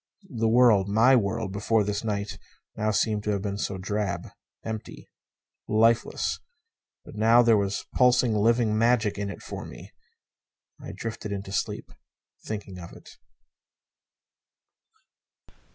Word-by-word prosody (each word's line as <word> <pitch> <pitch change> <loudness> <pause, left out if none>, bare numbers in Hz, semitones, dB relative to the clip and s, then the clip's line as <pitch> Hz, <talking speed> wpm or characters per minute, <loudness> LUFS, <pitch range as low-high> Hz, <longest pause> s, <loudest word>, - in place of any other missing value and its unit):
The 115 0 +1
world 110 -4 +4
my 115 +6 +5
world 100 -2 -1
before 105 +2 +1
this 105 +1 -3
night 105 -2 -3 0.4
now 110 +1 -1
seemed 105 0 0
to - - -1
have 100 -1 -3
been 100 -1 -3
so 100 - -3
drab. 100 +2 -3 0.4
Empty. 110 -1 -7 0.6
Lifeless. 115 +2 +1 0.7
But - - -12
now 115 +3 +5
there 115 -1 +5
was 100 -1 -1
pulsing, 125 -2 +3
living 110 +1 +2
magic 110 -2 +2
in 100 -1 -3
it 100 - -9
for - - -7
me. - - -11 0.9
I - - -7
drifted 115 -2 -6
into 100 -1 -5
sleep, - - -3 0.5
thinking 100 -3 -6
of 85 - -10
it. - - -14
105 Hz, 130 wpm, -26 LUFS, 100-115 Hz, 0.9 s, my